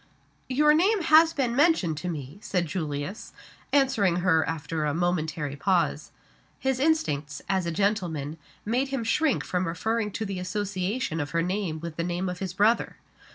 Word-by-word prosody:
"Your 300 Hz, +3 st, +4 dB
name 380 Hz, +5 st, +3 dB
has 320 Hz, +1 st, +6 dB
been 255 Hz, -6 st, -1 dB
mentioned 280 Hz, -, +3 dB
to 180 Hz, -, -4 dB
me," 150 Hz, +1 st, -6 dB
said 180 Hz, -4 st, -1 dB
Julius, 155 Hz, +3 st, -4 dB, 0.4 s
answering 260 Hz, -10 st, +3 dB
her 160 Hz, -3 st, +4 dB
after 160 Hz, 0 st, -3 dB
a 150 Hz, 0 st, 0 dB
momentary 160 Hz, -4 st, -1 dB
pause. 180 Hz, +3 st, 0 dB, 0.5 s
His 265 Hz, -1 st, -1 dB
instincts, 150 Hz, -, 0 dB
as 190 Hz, -3 st, 0 dB
a -, -, -1 dB
gentleman, 165 Hz, -6 st, -1 dB, 0.3 s
made 245 Hz, +6 st, +1 dB
him 270 Hz, -3 st, -2 dB
shrink 295 Hz, +5 st, +1 dB
from 180 Hz, 0 st, -1 dB
referring 220 Hz, +6 st, -1 dB
to 220 Hz, -, -3 dB
the 195 Hz, -2 st, -4 dB
association 190 Hz, 0 st, -2 dB
of 145 Hz, -1 st, -2 dB
her 165 Hz, -, +2 dB
name 180 Hz, -3 st, -2 dB
with 170 Hz, -2 st, -7 dB
the 170 Hz, -, -1 dB
name 175 Hz, +2 st, -2 dB
of 180 Hz, 0 st, -5 dB
his 190 Hz, -3 st, -3 dB
brother. 210 Hz, +5 st, +2 dB
185 Hz, 165 wpm, -26 LUFS, 165-235 Hz, 0.5 s, has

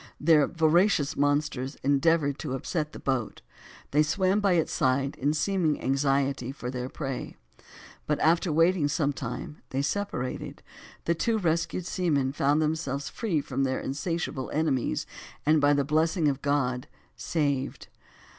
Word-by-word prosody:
The 150 Hz, -2 st, +5 dB
voracious 165 Hz, -1 st, +2 dB
monsters 145 Hz, -2 st, 0 dB
endeavored 140 Hz, +1 st, +2 dB
to 140 Hz, -4 st, -4 dB
upset 150 Hz, +3 st, -3 dB
the -, -, -9 dB
boat; 130 Hz, -4 st, -2 dB, 0.5 s
they 150 Hz, -, +4 dB
swam 185 Hz, +6 st, +2 dB
by 200 Hz, -3 st, +3 dB
its 165 Hz, -3 st, +1 dB
side 135 Hz, +2 st, +1 dB
in 145 Hz, +3 st, +1 dB
seeming 160 Hz, 0 st, +1 dB
anxiety 135 Hz, -1 st, 0 dB
for 125 Hz, -3 st, -6 dB
their 125 Hz, 0 st, -4 dB
prey, 135 Hz, -4 st, -5 dB, 0.7 s
but 150 Hz, -, 0 dB
after 170 Hz, +2 st, +3 dB
waiting 165 Hz, 0 st, +3 dB
sometime, 145 Hz, -2 st, -3 dB
they 135 Hz, +1 st, -1 dB
separated; 145 Hz, -7 st, -3 dB, 0.4 s
the 170 Hz, -, +2 dB
two 225 Hz, +7 st, 0 dB
rescued 170 Hz, -1 st, -1 dB
seamen, 145 Hz, -8 st, 0 dB
found 145 Hz, +2 st, +2 dB
themselves 150 Hz, -3 st, -2 dB
free 185 Hz, -10 st, -1 dB
from 135 Hz, -1 st, -2 dB
their 130 Hz, -1 st, 0 dB
insatiable 145 Hz, -1 st, -3 dB
enemies, 150 Hz, -5 st, 0 dB, 0.4 s
and, 155 Hz, 0 st, +4 dB
by 145 Hz, 0 st, +5 dB
the 140 Hz, -1 st, +2 dB
blessing 160 Hz, +2 st, +2 dB
of 140 Hz, -2 st, 0 dB
God, 135 Hz, -2 st, 0 dB, 0.3 s
saved. 140 Hz, -4 st, -2 dB
145 Hz, 140 wpm, -27 LUFS, 135-165 Hz, 0.7 s, The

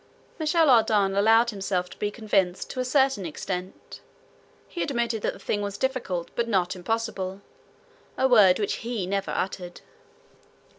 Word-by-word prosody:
Michel 320 Hz, +1 st, +3 dB
Ardan 215 Hz, -4 st, +3 dB
allowed 225 Hz, +4 st, +4 dB
himself 190 Hz, -3 st, -2 dB
to -, -, -12 dB
be 210 Hz, -, 0 dB
convinced 200 Hz, -4 st, -1 dB
to 255 Hz, -, -6 dB
a -, -, +1 dB
certain 265 Hz, -4 st, +2 dB
extent. 180 Hz, +3 st, -6 dB, 0.7 s
He 345 Hz, -, -6 dB
admitted 235 Hz, -5 st, -1 dB
that -, -, -1 dB
the -, -, -12 dB
thing 205 Hz, -, -2 dB
was 200 Hz, -1 st, -4 dB
difficult 200 Hz, -10 st, -2 dB
but 235 Hz, -1 st, -1 dB
not 190 Hz, -5 st, 0 dB
impossible, 195 Hz, -1 st, -3 dB, 0.8 s
a 265 Hz, -, +3 dB
word 210 Hz, -7 st, +6 dB
which 205 Hz, -, -1 dB
he 230 Hz, -5 st, -3 dB
never 195 Hz, +1 st, -2 dB
uttered. 180 Hz, -2 st, -4 dB
205 Hz, 150 wpm, -26 LUFS, 190-235 Hz, 0.8 s, word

